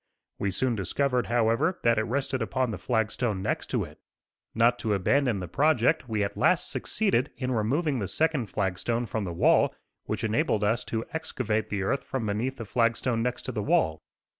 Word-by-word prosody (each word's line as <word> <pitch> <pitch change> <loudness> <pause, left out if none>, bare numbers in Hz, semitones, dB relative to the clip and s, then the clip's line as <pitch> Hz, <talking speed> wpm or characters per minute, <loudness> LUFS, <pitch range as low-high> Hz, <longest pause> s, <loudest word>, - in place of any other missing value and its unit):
We 100 - 0
soon 120 +7 0
discovered, 125 +6 0
however, 120 +9 +2
that 115 -2 +4
it 110 - 0
rested 130 0 -1
upon 130 -3 0
the - - -5
flag 110 -1 0
stone 105 -7 -1
next - - -1
to - - 0
it. - - -11 0.6
Not 115 +2 +3
to 110 -3 0
abandon 120 +3 +2
the 90 - -4
project, 140 - +2
we 110 -2 0
at 100 - -3
last - - +2
succeeded 170 - 0
in 130 -1 -2
removing 130 +6 0
the 100 - -2
second 155 - 0
flag 95 -1 -2
stone 120 0 -1
from 110 -2 -3
the 90 - -4
wall, 85 - +3 0.3
which - - -3
enabled 110 -1 +1
us 110 +3 +1
to 115 0 -3
excavate 125 -9 -2
the 100 -2 -2
earth 130 +7 0
from 130 -4 -3
beneath 115 +6 -2
the 115 - -6
flag 115 +2 +2
stone 120 -3 -1
next 125 +1 -2
to 130 - -4
the 110 -3 -3
wall. 80 -5 +1
115 Hz, 200 wpm, -27 LUFS, 105-130 Hz, 0.6 s, that